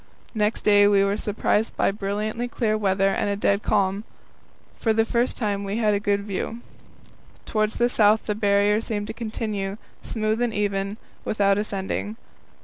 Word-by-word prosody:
Next 215 -1 0
day 205 -1 +6
we 200 -1 +4
were 200 0 +1
surprised 210 +1 0
by - - +2
brilliantly 210 +4 -3
clear 225 -3 0
weather 195 -2 +2
and 200 - 0
a 200 - 0
dead 200 0 +1
calm. 200 -1 +1 0.8
For 225 - +2
the 225 0 +2
first 235 +2 0
time 205 -3 -1
we 200 +2 -3
had 215 -2 +2
a 200 - +1
good 200 -1 0
view. 210 +3 -4 0.8
Towards 215 0 0
the 240 - +3
south 215 -2 +3
the 210 - 0
Barrier 205 0 +2
seemed 210 -2 -3
to 220 - -6
continue, 215 -3 -4 0.2
smooth 220 0 -1
and 240 -2 0
even, 200 0 -1 0.3
without 200 -1 +2
ascending. 205 +1 -3
210 Hz, 165 wpm, -24 LUFS, 200-220 Hz, 0.8 s, day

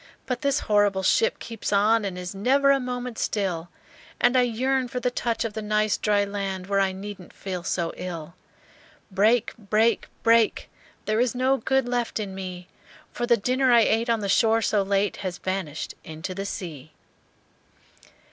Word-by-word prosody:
"But 250 -2 -3
this 280 -1 +1
horrible 205 -2 +2
ship 465 - +3
keeps 230 -2 -5
on, 210 +2 +3
And 185 -2 -4
is 180 +1 -5
never 270 +8 +3
a 275 - +3
moment 250 -2 -4
still, 180 -5 -2 0.5
And 245 +1 +3
I 255 - +6
yearn 255 +2 0
for 250 +1 -4
the 250 0 0
touch 235 -1 -1
of 225 - -4
the 220 - -4
nice 215 0 +1
dry 205 -1 +1
land, 195 -2 -4
Where 200 0 +1
I 195 -1 +2
needn't 195 -1 -8
feel 185 -2 -5
so 170 -1 -2
ill! 170 -3 -6 0.8
"Break! 215 +5 +3
break! 220 +2 +1 0.2
break! 230 -1 +3 0.3
There 215 +1 +1
is 250 0 +1
no 260 +2 +2
good 265 +2 +1
left 245 -2 -1
in 200 -3 -4
me; 185 -1 -7 0.4
For 240 - -3
the 235 -1 +5
dinner 255 +4 +2
I 235 -1 +7
ate 225 +2 +2
on 230 -2 +2
the 200 - -2
shore 225 +2 +3
so 205 -1 +2
late 200 +1 0
Has 185 -3 -4
vanished 185 -5 -4
into 160 +4 -6
the 195 +2 -4
sea!" 155 -7 -7
210 Hz, 175 wpm, -25 LUFS, 190-240 Hz, 0.8 s, I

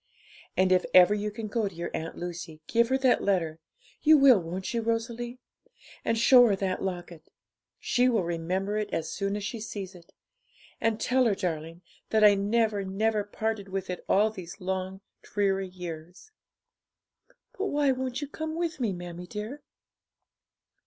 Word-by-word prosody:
And 185 0 +3
if 185 -1 +4
ever 185 +2 +8
you 210 0 -1
can 215 +1 -6
go 215 0 -1
to 195 - -8
your 170 +1 -4
Aunt 165 +1 -5
Lucy, 175 -2 -6
give 235 0 +2
her 265 - +3
that 260 -2 +3
letter; 165 -5 0 0.4
you 310 0 +7
will, 270 -6 +7
won't 180 +4 -5
you, 230 - 0
Rosalie? 230 +2 -2 0.7
and 230 - +1
show 245 +1 +7
her 205 - +2
that 190 -1 -2
locket; 175 -3 -5 0.5
she 250 +1 +2
will 225 -6 +2
remember 180 +5 -2
it 210 - -3
as 160 - -2
soon 200 0 -2
as 205 - -4
she 225 +3 -4
sees 205 -3 -6
it; 175 -2 -16 0.7
and 225 -1 +1
tell 255 +2 +2
her, 215 -4 +3
darling, 165 -1 -4 0.3
that 220 -1 +3
I 210 -1 +8
never, 205 +1 +1
never 210 +2 0
parted 210 -1 -3
with 190 -1 -3
it 180 - -6
all 215 +2 +4
these 180 -5 -9
long, 190 +1 -3 0.2
dreary 195 -1 0
years.' 180 - -9 1.2
'But 400 +1 -2
why 290 -4 +2
won't 260 +1 -3
you 290 - -3
come 315 +2 -5
with 335 -1 -2
me, 225 -6 0
mammie 175 0 -8
dear?' 215 +9 -6
200 Hz, 170 wpm, -28 LUFS, 180-230 Hz, 1.2 s, ever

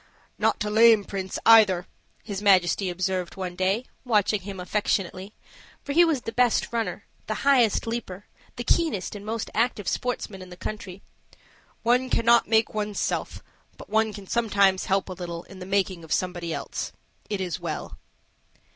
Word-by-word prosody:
"Not - - +1
a 210 - -2
lame 225 -1 +6
prince, 190 -1 -5
either," 205 -6 +6 0.4
his 200 -3 -5
Majesty 190 -1 +3
observed 185 0 -2
one 185 -2 -5
day, 195 +6 0 0.2
watching 210 -4 +2
him 195 0 -7
affectionately; 195 0 -2 0.5
for 285 - -4
he 345 +3 +7
was 320 -6 +1
the 225 - -5
best 245 -1 +1
runner, 220 -5 -2 0.2
the 215 - -2
highest 250 -7 +4
leaper, 220 -4 -5 0.3
the 240 - -4
keenest 300 - 0
and 205 -1 -8
most 220 +1 -4
active 220 -4 0
sportsman 215 -3 -3
in 185 - -10
the 180 - -11
country. 195 -2 -7 0.8
"One 250 +3 +2
cannot 235 0 +4
make 220 0 +2
one's 210 -1 -2
self, - - -2 0.3
but - - -13
one 220 0 +2
can 205 -2 -9
sometimes 200 -4 +2
help 195 0 +1
a 185 - -5
little 170 -2 -6
in 190 - -13
the 185 - -8
making 190 -3 0
of 160 - -13
somebody 175 -2 -1
else. - - -4 0.4
It 205 - -2
is 180 -4 -3
well." - - -5
205 Hz, 165 wpm, -25 LUFS, 185-225 Hz, 0.8 s, he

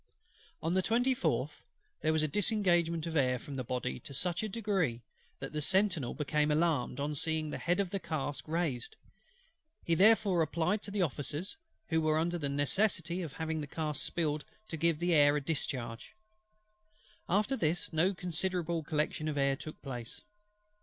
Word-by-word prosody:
On 165 +2 +1
the 190 - +3
24th 185 - +1 0.4
there 155 - +2
was 160 -1 +2
a - - +2
disengagement 175 -3 +2
of 165 -1 -4
air 130 -4 +3
from 140 +3 -8
the 130 - -2
Body 120 - -3
to 140 - -9
such 175 +3 +1
a 215 - -2
degree, 190 - -1 0.4
that 135 +2 -6
the 150 - -1
sentinel 185 -6 +2
became 150 +1 +1
alarmed 150 -5 +1
on 145 +2 -1
seeing 155 +1 -1
the - - -4
head 175 +3 +1
of 195 -3 0
the 195 - -1
cask 145 -5 -4
raised: 155 -7 -2 0.9
he 170 - +2
therefore 195 -1 +5
applied 170 +6 +1
to - - -7
the 200 -2 +1
Officers, 155 - -3 0.3
who 160 -1 +2
were 155 0 +2
under 170 +2 0
the 145 -3 -1
necessity 170 - +1
of 160 -6 -5
having 160 -1 -2
the 145 - -5
cask 150 -1 -1
spiled 155 -3 -1 0.3
to - - -3
give 165 0 +2
the 175 +2 +1
air 145 -2 +6
a - - -1
discharge. 130 -6 -3 1.1
After 210 +9 +2
this, 170 -5 0
no 180 +5 +2
considerable 175 -1 -1
collection 155 0 -1
of 150 -1 -2
air 140 -1 +3
took 155 +3 -9
place. 120 -4 -6
160 Hz, 175 wpm, -32 LUFS, 145-180 Hz, 1.1 s, air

